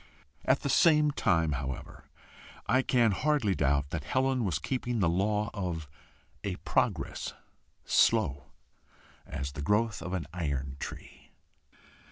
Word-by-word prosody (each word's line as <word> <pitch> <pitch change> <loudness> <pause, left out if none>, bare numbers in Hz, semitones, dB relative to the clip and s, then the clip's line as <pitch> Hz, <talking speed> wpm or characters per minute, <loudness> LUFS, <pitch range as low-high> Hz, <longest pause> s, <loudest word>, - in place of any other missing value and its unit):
At - - +3
the - - -2
same 150 -3 +5
time, 85 - +2
however, 65 -2 -5 0.6
I 130 - +3
can 120 -4 +3
hardly 135 -2 +1
doubt 70 -2 +1
that 80 -3 -3
Helen 130 -1 +1
was 90 -8 0
keeping 120 - -2
the 90 - +3
law 105 +5 +1
of 90 -7 -3 0.6
a - - -2
progress - - -1 0.5
slow 100 -12 +3 0.8
as 70 -1 -4
the 70 - -6
growth 105 +6 +1
of 90 - -5
an 90 -5 -2
iron 70 -6 -3
tree. - - -9
95 Hz, 130 wpm, -30 LUFS, 75-115 Hz, 0.8 s, same